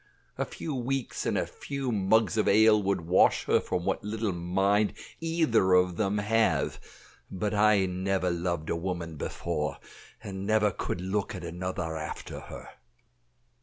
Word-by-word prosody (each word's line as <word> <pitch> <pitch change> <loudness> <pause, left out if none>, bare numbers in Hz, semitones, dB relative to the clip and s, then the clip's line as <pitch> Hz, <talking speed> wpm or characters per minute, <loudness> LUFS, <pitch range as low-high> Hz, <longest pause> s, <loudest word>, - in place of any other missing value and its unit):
A - - -1
few 155 - -6
weeks, 130 0 -2
and - - +1
a - - +1
few 140 -3 -4
mugs 110 +2 +2
of 110 - +1
ale 110 +1 +6
would 100 -2 0
wash 85 +3 +3
her - - +3
from 90 -1 -3
what - - -1
little 105 0 -2
mind 95 +4 +1 0.3
either 160 - +2
of 90 -1 +4
them 105 0 0
have; 110 +2 +1 0.5
but 100 +2 -2
I 105 -2 +4
never 95 0 0
loved 85 -2 -2
a - - +1
woman 85 -2 -4
before, 75 -1 -3 0.5
and 95 -1 -6
never 110 -1 +3
could 90 - -4
look 100 +3 -2
at 90 - -7
another 85 -1 -4
after 75 -1 -6
her." - - -10
95 Hz, 155 wpm, -28 LUFS, 90-110 Hz, 0.5 s, ale